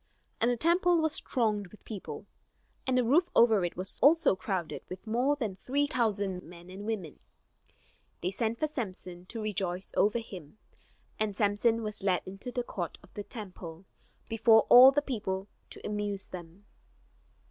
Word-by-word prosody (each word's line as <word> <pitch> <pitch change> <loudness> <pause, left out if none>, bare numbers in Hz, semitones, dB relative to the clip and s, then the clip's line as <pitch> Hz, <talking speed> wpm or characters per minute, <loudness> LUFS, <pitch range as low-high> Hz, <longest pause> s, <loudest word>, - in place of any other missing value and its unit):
And 235 - +3
the 245 - +1
temple 345 +5 +3
was 315 -1 +1
thronged 215 -6 0
with 215 - -18
people, 210 -4 -7 0.6
and 255 -1 +2
the 250 - +4
roof 315 +10 +3
over 225 -5 +5
it 175 - -3
was 185 +1 -2
also 310 - +5
crowded 185 -4 -3
with 185 +4 -8
more 245 +6 +1
than 225 -9 -3
three 280 +7 0
thousand 205 -8 -1
men 175 +1 -13
and 200 +3 -8
women. 195 -9 -4 1.0
They 180 - -1
sent 225 +3 -1
for 310 - 0
Samson, 185 -10 -6
to 230 - -7
rejoice 190 -3 -3
over 210 +3 +3
him; 190 -7 -9 0.6
and 215 -2 -1
Samson 225 +2 +2
was 210 0 -4
led 190 -2 +1
into 195 +6 -7
the 245 0 -2
court 175 -8 -5
of - - -19
the 205 - -5
temple, 185 -6 -9 0.4
before 225 0 +5
all 255 +2 +11
the 290 +2 +1
people, 200 -7 -3 0.2
to - - -11
amuse 205 -1 -3
them. 175 +2 -10
210 Hz, 165 wpm, -30 LUFS, 190-245 Hz, 1.0 s, all